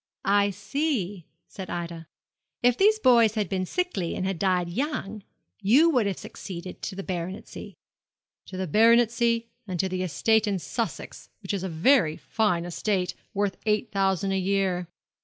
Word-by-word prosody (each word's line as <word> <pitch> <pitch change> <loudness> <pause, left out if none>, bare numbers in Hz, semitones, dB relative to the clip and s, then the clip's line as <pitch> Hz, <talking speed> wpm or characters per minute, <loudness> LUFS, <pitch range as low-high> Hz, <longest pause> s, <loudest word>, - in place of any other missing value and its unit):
'I 200 +1 +3
see,' 200 - -2 0.2
said 190 -2 -8
Ida. 170 -2 -5 0.6
'If 245 -1 +5
these 425 - +4
boys 235 - +5
had 210 -3 0
been 185 +1 -2
sickly 355 - -2
and 185 - -2
had 190 -3 -2
died 180 -3 +1
young, 215 - -3 0.4
you 270 +12 +5
would 245 -8 +2
have 195 - -2
succeeded 180 -1 -8
to 195 - -5
the 195 - -5
baronetcy.' 185 0 -6 0.7
'To 185 - -8
the 190 - -2
baronetcy 230 +3 +3 0.2
and 180 -2 -4
to 190 - +2
the 185 0 -3
estate 220 +6 +2
in 200 -2 0
Sussex, 225 +5 -5
which - - -3
is 195 - -2
a 190 - -3
very 165 - +3
fine 195 -6 0
estate, 180 +1 -1 0.2
worth 200 -1 0
eight 210 0 +1
thousand 195 -1 +1
a 195 - +1
year.' 185 -2 0
195 Hz, 160 wpm, -26 LUFS, 185-230 Hz, 0.7 s, If